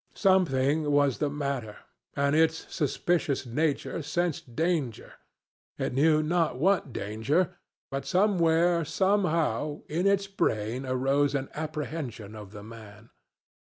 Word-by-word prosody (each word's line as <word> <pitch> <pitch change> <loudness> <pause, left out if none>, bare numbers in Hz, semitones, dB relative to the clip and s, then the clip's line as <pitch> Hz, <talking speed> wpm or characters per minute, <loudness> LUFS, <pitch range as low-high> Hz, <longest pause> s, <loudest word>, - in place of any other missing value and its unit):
Something 155 -6 +2
was 145 -3 +2
the 150 - +1
matter, 140 -7 -3 0.4
and 140 +1 +2
its 160 0 +2
suspicious 155 -2 0
nature 150 +6 -1
sensed 160 -5 -2
danger,—it 160 -10 -4
knew 155 +3 +4
not 165 -4 +1
what 180 -1 +2
danger 115 - -1 0.4
but 135 0 -4
somewhere, 175 -3 +3
somehow, 160 - 0
in 175 +5 0
its 200 0 +2
brain 125 - -1
arose 135 +3 +1
an 135 -1 -2
apprehension 150 -8 -5
of 105 -2 -9
the 105 -1 -10
man. 110 -1 -12
150 Hz, 115 wpm, -28 LUFS, 130-170 Hz, 0.4 s, knew